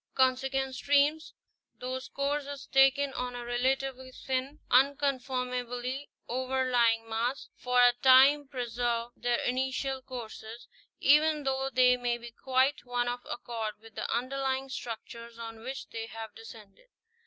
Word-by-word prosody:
Consequent 265 +1 +1
streams, 290 +3 +2 0.4
whose 260 +1 -4
course 280 +1 -2
is 285 -1 -7
taken 270 +1 +4
on 250 -1 -4
a 240 0 -6
relatively 260 +1 -1
thin, 265 +3 -3
unconformably 255 -1 0 0.2
overlying 250 -3 +1
mass, 235 +4 -2
for 250 0 +1
a 245 0 +7
time 270 +2 +7
preserve 240 -2 -2
their 240 0 0
initial 265 +1 -1
courses, 235 -2 -8 0.3
even 300 +1 +4
though 270 0 -1
they 250 0 +5
may 245 -1 -1
be 240 0 -10
quite 260 +3 +1
out 245 0 0
of 245 0 -3
accord 225 -3 -4
with 225 0 -15
the - - -4
underlying 265 +2 -1
structures 235 -1 -7
on 225 -1 -8
which 260 +3 -6
they 225 0 -5
have 225 -1 -8
descended. 225 - -14
255 Hz, 130 wpm, -30 LUFS, 240-270 Hz, 0.4 s, a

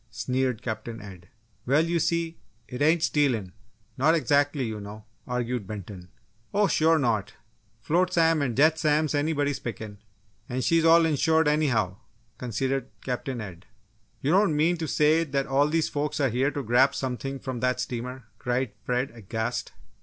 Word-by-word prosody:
sneered 130 -2 -2
Captain 115 0 -5
Ed. 95 -5 -11 0.4
"Well, 145 +5 +3
you 170 0 0
see, 170 0 -1 0.3
it 125 - -7
ain't 160 +2 +3
stealin' 120 -11 +1 0.5
not 155 +5 +4
exactly, 145 -1 +1
you 110 -2 -4
know!" 105 +1 -9 0.2
argued 125 -3 -2
Benton. 95 -3 -8 0.5
"Oh 205 0 +4
sure 160 -3 +3
not! 110 -8 -1 0.5
Flotsam 165 +2 +2
and 125 -4 -1
jetsam's 155 0 +3
anybuddy's 145 -1 0
pickin's, 110 -3 -7 0.5
and 125 +1 -2
she's 165 -1 +3
all 165 0 +6
ensured 160 +1 +2
anyhow," 125 -11 +1 0.4
conceded 130 +2 -2 0.2
Captain 125 0 -3
Ed. 95 -4 -9 0.5
"You 140 - +1
don't 190 -3 +3
mean 165 +4 +3
to 160 -1 -3
say 155 +3 +3
that 140 -3 -1
all 140 +2 +2
these 160 +1 +1
folks 145 0 -2
are 135 -2 +2
here 130 +4 +1
to 145 -1 -4
grab 130 +4 +3
something 135 +1 -3
from 130 -2 -5
that 125 +1 0
steamer?" 125 +1 -4 0.2
cried 125 -1 -1
Fred, 125 +1 -1
aghast. 115 +1 -4
135 Hz, 155 wpm, -26 LUFS, 120-155 Hz, 0.5 s, all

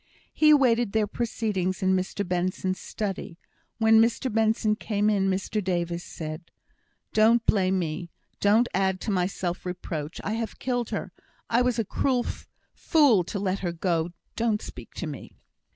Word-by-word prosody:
He 305 - +4
awaited 240 -7 +4
their 220 -1 +3
proceedings 205 -4 -2
in 190 0 +3
Mr 190 +1 -2
Benson's 185 +1 -1
study. 195 -4 -5 0.4
When 220 0 +6
Mr 230 +1 +1
Benson 220 -1 +2
came 210 -1 0
in, 195 -2 +2
Mr 195 +2 -1
Davis 175 -1 -1
said: 155 +1 -7 0.6
"Don't 225 +2 +4
blame 190 -2 +3
me. 170 0 -3 0.3
Don't 215 +4 +4
add 190 0 +1
to 220 - -2
my 180 -2 +2
self 180 -2 -4
reproach. 165 -4 -5
I 205 - -2
have 225 0 -3
killed 245 -2 -2
her. - - -4 0.4
I 235 +2 +4
was 250 -1 +1
a 225 - 0
cruel 250 +4 0 0.5
fool 280 - +4
to 200 - -4
let 195 -1 -1
her 175 -2 -2
go. 170 -1 0 0.3
Don't 225 -2 0
speak - - -10
to - - -4
me." - - -8
200 Hz, 160 wpm, -26 LUFS, 185-225 Hz, 0.6 s, When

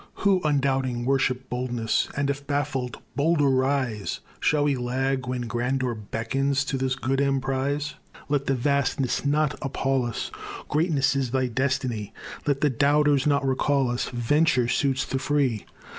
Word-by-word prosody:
Who, 195 -2 +4
undoubting, 135 -4 +1
worship 130 -1 +1
boldness, 120 -2 -1
And, 140 0 +1
if 140 0 -7
baffled, 135 -4 -2 0.2
bolder 145 +1 +3
rise, 130 -5 0 0.2
Shall 150 -1 +2
we 145 -1 +2
lag 130 +1 -1
when 125 -1 -2
grandeur 125 +2 -1
beckons 135 +6 -1
To 135 - -2
this 130 0 0
good 135 +1 0
emprize? 140 +2 0 0.3
Let 140 -1 0
the 135 - +2
vastness 135 -1 0
not 150 +1 +2
appal 135 -1 0
us; 120 - -4 0.4
Greatness 150 -4 +2
is 135 -2 0
thy 130 +1 +1
destiny. 130 -4 -1 0.3
Let 140 -1 +1
the 150 - +4
doubters 145 +1 +3
not 140 -1 +2
recall 135 -1 +1
us: 120 - -2
Venture 125 +1 +2
suits 135 +1 +1
the 135 - -2
free. 135 -7 0
135 Hz, 145 wpm, -25 LUFS, 125-140 Hz, 0.4 s, Who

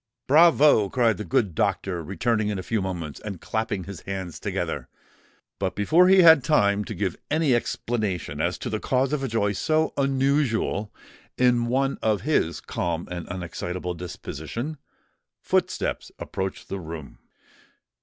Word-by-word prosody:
"Bravo!" 150 - +5
cried 115 -4 +2
the 105 - -4
good 110 -7 +1
doctor, 90 +3 -1
returning 110 +6 0
in 105 - -2
a 95 - -5
few 110 0 -1
moments, 85 -6 -4
and 100 -5 -6
clapping 110 -2 -2
his 95 -2 -8
hands 95 -4 -5
together. - - -3 0.7
But 95 -1 -1
before 160 - +4
he 190 -1 +7
had 160 -5 +8
time 105 -8 +3
to - - -6
give 95 -4 -1
any 155 -3 +2
explanation 105 -10 -2
as 90 +2 0
to 120 - -5
the 110 - -1
cause 130 +4 0
of 150 - 0
a 135 - -1
joy 110 -3 +1
so 155 +10 +1
unusual 135 -6 +1 0.5
in 120 -2 +3
one 135 +3 0
of 110 -2 +1
his 120 - 0
calm 85 -1 -3
and 90 -1 -5
unexcitable 90 0 -4
disposition, 90 - -6 0.6
footsteps - - -1
approached 95 0 -5
the 100 - -4
room. 80 -4 -8
105 Hz, 150 wpm, -25 LUFS, 90-130 Hz, 0.7 s, had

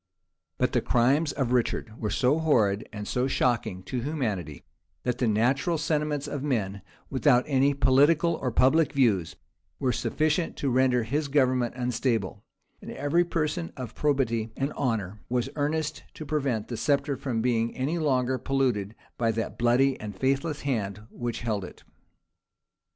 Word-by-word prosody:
But - - +1
the - - +2
crimes 140 +6 +2
of 135 -4 -2
Richard 120 -2 0
were 105 - -1
so 130 +8 +2
horrid 110 -10 +2
and 105 -1 -6
so 125 +1 0
shocking 115 -8 0
to 125 +4 -3
humanity, 110 - -3 0.4
that 125 -1 -1
the 125 - +2
natural 130 +9 +2
sentiments 150 -2 -1
of 145 - -4
men, 105 -9 -1 0.3
without 125 -1 +4
any 140 0 +2
political 145 +6 +4
or 130 - -2
public 135 +5 +3
views, 100 - +2 0.4
were 130 - 0
sufficient 155 +7 0
to 140 - -1
render 125 -1 +3
his 145 +6 -1
government 130 -4 +2
unstable; 115 -5 -1 0.4
and - - -9
every 145 +5 +1
person 165 0 -2
of 125 -4 -6
probity 125 -6 0
and 135 +2 -1
honor 105 -6 -2
was 125 +1 0
earnest 150 +1 -1
to 155 - -7
prevent 135 -7 -1
the 120 - -5
sceptre 140 +1 +1
from 120 -5 -2
being 115 -2 0
any 145 +7 -1
longer 130 -4 +1
polluted 120 -6 0 0.2
by 115 -1 +2
that 115 0 -4
bloody 125 +3 +3
and 105 -2 -7
faithless 140 - 0
hand 105 -7 -2
which 120 -1 -4
held 110 -4 -1
it. - - -11
130 Hz, 155 wpm, -27 LUFS, 115-145 Hz, 0.4 s, without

